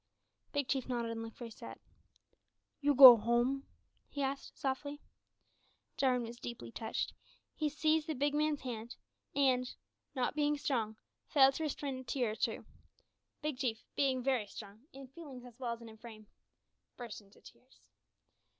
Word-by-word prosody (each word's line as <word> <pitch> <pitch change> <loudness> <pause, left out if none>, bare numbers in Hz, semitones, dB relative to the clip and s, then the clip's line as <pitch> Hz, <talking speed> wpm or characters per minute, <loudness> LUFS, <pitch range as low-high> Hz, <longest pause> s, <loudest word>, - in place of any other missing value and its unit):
Big 285 -3 -1
Chief 265 -1 -1
nodded 235 -2 -1
and 225 0 -4
looked 225 0 -8
very 235 -2 -7
sad. - - -10 1.0
"You 290 -1 +2
go 255 -3 +12
home?" 240 +5 +1 0.4
he 285 - -3
asked, 275 +1 -4
softly. 285 +2 -3 1.0
Jarwin 250 -3 +2
was 235 +1 -8
deeply 230 - -7
touched, 220 - -3 0.4
he 305 -1 -1
seized 310 +1 +1
the 315 - -2
big 285 +2 +1
man's 300 -1 +1
hand, 235 -2 -6 0.4
and, 255 -3 +2 0.4
not 255 -2 0
being 295 0 +1
strong, 230 -7 -1 0.3
failed 270 -3 +6
to 320 - -3
restrain 280 -2 -3
a - - -8
tear 245 -4 -1
or - - -5
two. - - -2 0.8
Big 300 -4 -2
Chief, 235 -5 -2
being 265 -3 +1
very 255 -5 +1
strong 210 +6 -11
in 270 0 -10
feelings 270 -3 -10
as 245 0 -14
well 240 -3 -2
as 235 - -10
in 220 -1 -11
frame 220 -2 -11 0.7
burst 235 -3 -7
into 200 0 -21
tears. 255 +1 -18
255 Hz, 160 wpm, -34 LUFS, 235-280 Hz, 1.0 s, go